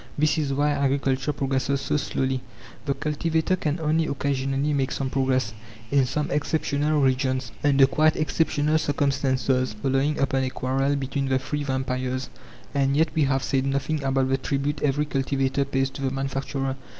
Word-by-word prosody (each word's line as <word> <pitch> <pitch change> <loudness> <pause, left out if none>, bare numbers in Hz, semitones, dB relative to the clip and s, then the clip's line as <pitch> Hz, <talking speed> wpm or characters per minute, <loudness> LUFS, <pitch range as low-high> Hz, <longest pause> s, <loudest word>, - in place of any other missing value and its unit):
This 155 +1 +2
is 145 -3 -1
why 145 +2 +2
agriculture 135 -1 +1
progresses 135 0 0
so - - -1
slowly. 130 -2 -1 0.5
The 140 - +1
cultivator 160 +3 0
can 160 -2 -2
only 160 0 +1
occasionally 140 +1 -1
make 135 -2 0
some 135 -1 -2
progress, 130 -5 +1 0.4
in 140 -2 +3
some 150 +3 -2
exceptional 150 0 +1
regions, 130 -2 +1
under 140 -2 +6
quite 155 +3 +3
exceptional 155 0 +1
circumstances, 135 -4 +1
following 135 +6 0
upon 135 -1 +1
a 130 - 0
quarrel 135 +2 0
between 140 0 -2
the 130 0 +2
three 145 +2 -3
vampires. 130 -1 -2 0.4
And 140 0 +2
yet 160 +1 +3
we 155 -2 +2
have 135 -1 +1
said 135 0 0
nothing 140 +3 -1
about 135 -1 +1
the 135 0 +1
tribute 140 +2 -2
every 145 +1 +1
cultivator 135 -1 0
pays 135 0 0
to 140 - -8
the 135 - +1
manufacturer. 135 0 -3
135 Hz, 160 wpm, -25 LUFS, 135-145 Hz, 0.5 s, under